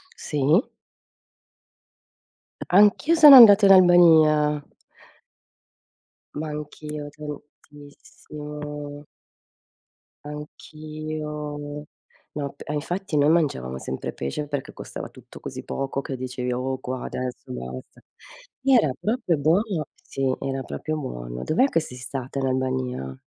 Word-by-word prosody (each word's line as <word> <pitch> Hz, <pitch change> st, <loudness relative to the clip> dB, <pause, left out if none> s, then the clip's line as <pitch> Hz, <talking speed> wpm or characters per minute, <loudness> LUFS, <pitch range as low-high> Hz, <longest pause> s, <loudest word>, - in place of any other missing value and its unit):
Sì? 150 Hz, +5 st, +1 dB, 2.1 s
Anch'io 210 Hz, -, +4 dB
sono 300 Hz, -4 st, +10 dB
andata 210 Hz, -4 st, +9 dB
in 195 Hz, -, +7 dB
Albania. 160 Hz, -5 st, +5 dB, 1.8 s
Ma 155 Hz, -, -4 dB
anch'io 150 Hz, 0 st, -7 dB
tantissimo. 150 Hz, 0 st, -10 dB, 1.2 s
Anch'io 150 Hz, 0 st, -7 dB, 0.5 s
No, 140 Hz, -2 st, -4 dB
p -, -, -20 dB
e -, -, -5 dB
infatti 175 Hz, +2 st, -3 dB
noi 145 Hz, +1 st, +4 dB
mangiavamo 100 Hz, -, 0 dB
sempre 65 Hz, 0 st, -5 dB
pesce 70 Hz, -, -4 dB
perché 145 Hz, -2 st, -5 dB
costava -, -, -8 dB
tutto -, -, -15 dB
così -, -, -7 dB
poco 135 Hz, 0 st, -3 dB
che 135 Hz, -1 st, -5 dB
dicevi:" 125 Hz, 0 st, -4 dB
Oh 130 Hz, +2 st, -2 dB
qua 130 Hz, -1 st, -5 dB
adesso 125 Hz, -1 st, -6 dB
basta!" 65 Hz, +1 st, -8 dB, 0.6 s
Era 250 Hz, -, +4 dB
proprio 215 Hz, -7 st, 0 dB
buono! 170 Hz, +3 st, 0 dB
Sì, 135 Hz, -1 st, -2 dB
era 135 Hz, 0 st, -3 dB
proprio 155 Hz, +4 st, -5 dB
buono. -, -, -6 dB
Dov'è 250 Hz, +12 st, +2 dB
che 165 Hz, -, +1 dB
sei 125 Hz, -5 st, -9 dB
stata 130 Hz, +1 st, -6 dB
in 135 Hz, -, -1 dB
Albania? 130 Hz, -, -3 dB
150 Hz, 110 wpm, -24 LUFS, 130-155 Hz, 2.1 s, sono